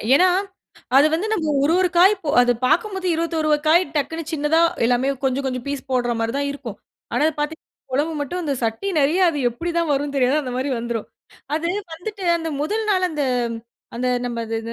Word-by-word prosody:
ஏனா, 365 +5 +6 0.7
அது 285 +2 +7
வந்து 360 +6 -1
நம்ம 315 -8 0
ஒரு, 310 - +3
ஒரு 370 - +3
காய் 380 +4 +7 0.3
அத 245 0 +4
பாக்கும்போது 370 +5 0
21 325 -1 -1
வக் 295 +1 +1
காய், 345 +3 +5
டக்குன்னு 320 +3 -2
சின்னதா 310 +1 +2 0.2
எல்லாமே 245 +3 +2 0.2
கொஞ்சம், 265 +1 0
கொஞ்சம் 255 -2 -3
பீஸ் 280 -1 -4
போட்ற 245 -2 +1
மாரி 225 0 -1
தான் 280 0 -1
இருக்கும். 245 -7 -8 0.4
ஆனா - - +1
இத 315 - 0
பாத்தீங்கன்னா 310 +2 -4 0.3
குழம்பு 305 +4 0
மட்டும் 350 +6 -3
அந்த 290 -3 -1
சட்டி 225 - -2
நெறைய 310 +7 +2
அது 295 - -4
எப்டி 285 +9 -4
தான் 335 -3 0
வருன்னு 285 0 -1
தெரியாது, 265 +2 +3
அந்த 250 -2 -5
மாரி 265 +2 -1
வந்துரும். 235 -1 -4 0.5
அது 325 +2 -1 0.3
வந்துட்டு 400 +4 -7 0.2
அந்த 325 -1 -4
1ல் 435 +8 -1
நாள் 370 -2 +2
அந்த 300 -3 -1 0.7
அந்த 250 +2 -1 0.2
நம்ம, 240 -1 -3
அது 225 0 -2
295 Hz, 190 wpm, -21 LUFS, 255-335 Hz, 0.7 s, அது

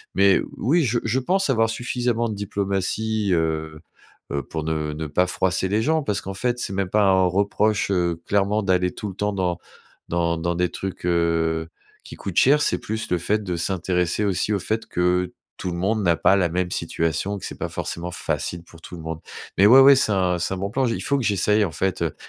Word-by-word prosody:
Mais 100 -1 +5 0.2
oui, 160 +9 +2
je 120 0 +1
je 115 +4 +1
pense 185 +5 +1
avoir 115 -3 +2
suffisamment 120 0 -1
de - - -3
diplomatie, 100 +2 -1
heu 80 -2 -1 0.5
heu, 70 -1 -2
pour 80 +4 -5
ne 80 -1 -2
ne 80 +1 -4
pas 85 +5 +2
froisser 95 +1 0
les 105 +3 +1
gens 155 +5 +1
parce 105 -6 -1
qu'en 95 - -6
fait, 120 +5 -1
c'est 100 - -3
même 95 -1 -1
pas 105 +2 +3
un 95 -1 +4
reproche, 100 +2 +1
heu, 85 -3 0
clairement 100 +1 +1
d'aller 90 -1 +1
tout 105 - -6
le - - -7
temps 105 +1 -1
dans 90 -3 -1 0.5
dans 85 -1 0
dans 85 +1 -1
des 90 0 +1
trucs, 95 -2 -6
heu, 85 -1 +1 0.3
qui - - -10
coûtent 95 - -6
cher. 145 +3 +5
C'est - - +1
plus 110 +1 -4
le 90 - +3
fait 105 +5 -1
de 90 -3 -3
s'intéresser 90 +2 0
aussi 100 +2 0
au 100 - 0
fait 110 +4 -2
que, 90 +1 0 0.2
tout 90 - -4
le 85 - -4
monde 105 +4 0
n'a 85 -2 +3
pas 90 +6 +4
la 90 -4 +2
même 90 +1 -1
situation, 85 +4 -2
que - - -7
c'est - - -7
pas - - -4
forcément 85 +1 -4
facile 85 0 -3
pour 85 -1 -16
tout 90 - -10
le 85 - -9
monde. 80 0 -5 0.4
Mais 95 - +6
ouais, 125 +6 +9
ouais, 140 +1 +8
c'est 130 -5 +2
un 90 -2 +1
c'est 90 - -1
un - - -3
bon 100 +2 -3
plan, 135 +2 +1
j'y 115 -2 0
il - - -5
faut 140 - +1
que 130 - -2
j'essaye, 105 +1 +2
en 90 - -4
fait, 95 +1 -1
heu, 80 - -2
95 Hz, 230 wpm, -23 LUFS, 85-105 Hz, 0.5 s, ouais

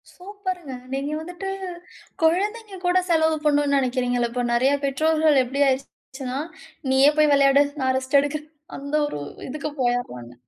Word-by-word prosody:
சூப்பர்ங்க. 370 -6 -6 0.2
நீங்க 275 +2 -2
வந்துட்டு 355 +3 -7 0.8
கொழந்தைங்க 410 +5 0
கூட 355 +1 +3
செலவு 320 -1 +3
பண்ணுன்னு 290 -1 +2
நெனைக்கிறீங்கள்ல, 245 -2 0
இப்ப 245 0 -2
நெறைய 260 +4 +3
பெற்றோர்கள் 310 +1 +3
எப்டி 270 +3 -3
ஆயிருச்சுனா, 265 0 -4 0.5
நீயே 270 +2 +6
போய் 300 -1 +5
விளையாடு, 280 0 +5 0.2
நான் 260 0 +1
ரெஸ்ட் 265 +2 +2
எடுக்றேன், 300 +1 -4 0.3
அந்த 280 +2 -4
ஒரு 150 - -5 0.3
இதுக்கு 300 +2 -4
போயறாங்க. 240 - -2
280 Hz, 130 wpm, -23 LUFS, 260-320 Hz, 0.8 s, நீயே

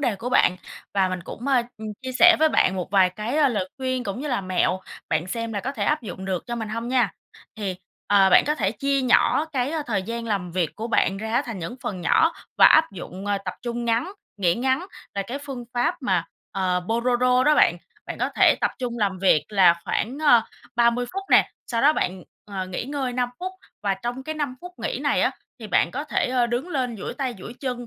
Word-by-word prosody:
đề 240 -8 0
của 235 +5 -5
bạn, 180 -7 +3 0.4
và 190 -2 +3
mình 185 -1 -3
cũng, 240 - -8
à, 255 -3 +4 0.2
ừm, 220 0 -6
chia 260 - -4
sẻ 345 0 +8
với 315 +1 +5
bạn 190 -9 +2
một 180 - -3
vài 190 -2 +4
cái, 215 +9 -4
a, 295 -3 +5
lời 200 -6 -2
khuyên 255 -1 -2
cũng 200 +4 -4
như 295 - -4
là 245 -6 0
mẹo, 185 0 0 0.3
bạn 155 +2 0
xem 230 +4 -4
là 205 - -2
có 270 +6 -3
thể - - -2
áp 300 -2 +1
dụng 190 -4 -7
được 185 -2 -2
cho 240 0 -3
mình 220 -2 -4
hông 230 +2 -4
nha. 245 -8 +2 0.4
Thì, 195 -4 -3 0.3
ờ, 195 -2 +5
bạn - - +7
có 300 - +2
thể 200 -7 0
chia 275 +5 0
nhỏ 255 +4 +3
cái, 260 -1 0
ơ, 320 -1 -2
thời 205 -5 0
gian 230 +3 -5
làm 195 -5 -2
việc 175 -3 -1
của 225 +1 -4
bạn 195 -3 +2
ra 220 +1 -4
á, 240 - +2
thành 225 -5 -5
những 170 +8 -6
phần 185 -3 -4
nhỏ, 320 - +3 0.3
và - - +9
áp 315 -7 +5
dụng, 190 +1 -8
ờ, 205 -1 +1
tập 185 - -4
trung 240 0 -3
ngắn, 235 +11 0 0.2
nghỉ 175 -4 +2
ngắn 265 +8 0 0.3
là 200 - -1
cái 255 +6 -4
phương 275 -4 -7
pháp 245 0 +1
mà, 185 -9 +1 0.3
ờ, 185 -2 0
Pomodoro 250 +2 +2
đó 300 0 +5
bạn. - - +4 0.3
Bạn - - -6
có - - 0
thể - - +6
tập - - +2
trung 240 -2 -3
làm 195 -3 0
việc 185 -5 +3
là 190 -5 +5
khoảng, 255 +6 -2
ờ, 240 -5 +7 0.3
30 240 +1 +3
phút 390 +1 -3
nè, - - +5 0.2
sau 230 -2 -1
đó 295 +2 +6
bạn, 185 - -2 0.3
ờ, 190 -2 -3
nghỉ 185 +4 -4
ngơi 270 -2 -3
5 245 0 0
phút, 370 +1 -4 0.3
và 200 -1 +1
trong 240 +6 -5
cái 310 +3 -5
5 290 -4 -2
phút 360 0 -9
nghỉ - - -3
này - - +1
á, - - +3 0.3
thì 220 - -8
bạn - - +2
có 285 +4 -4
thể, - - 0
ơ, 250 -1 +2
đứng 240 +8 -2
lên 255 -7 -2
duỗi - - -6
tay 260 -4 -3
duỗi 230 +6 -9
chân, 250 -3 -4
235 Hz, 245 wpm, -24 LUFS, 195-260 Hz, 0.4 s, và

